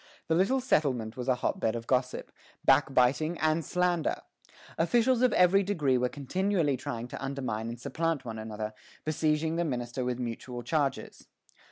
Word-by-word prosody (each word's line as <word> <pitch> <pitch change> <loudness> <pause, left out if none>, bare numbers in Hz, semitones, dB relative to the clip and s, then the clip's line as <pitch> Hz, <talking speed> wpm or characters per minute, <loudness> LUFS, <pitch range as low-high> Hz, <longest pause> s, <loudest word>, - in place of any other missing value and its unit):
The - - +3
little 195 +11 +3
settlement 130 - 0
was 125 0 -5
a 130 - +3
hot 125 - -2
bed 110 +1 0
of 115 0 -5
gossip, 125 0 -1 0.3
backbiting, 140 +6 +3
and 155 +1 +2
slander. 175 0 0 0.6
Officials 240 +8 +3
of 255 - +4
every 180 +2 +5
degree 155 -10 +1
were 125 0 +1
continually 165 +2 0
trying 120 -1 -5
to - - -7
undermine 130 -5 -3
and 120 0 -7
supplant 160 +1 -2
one 110 -2 -5
another, 110 0 -5 0.3
besieging 155 +1 0
the 170 - +1
minister 125 -4 -3
with 125 -1 -1
mutual 120 0 -5
charges. 145 -3 -2
140 Hz, 160 wpm, -29 LUFS, 125-165 Hz, 0.6 s, every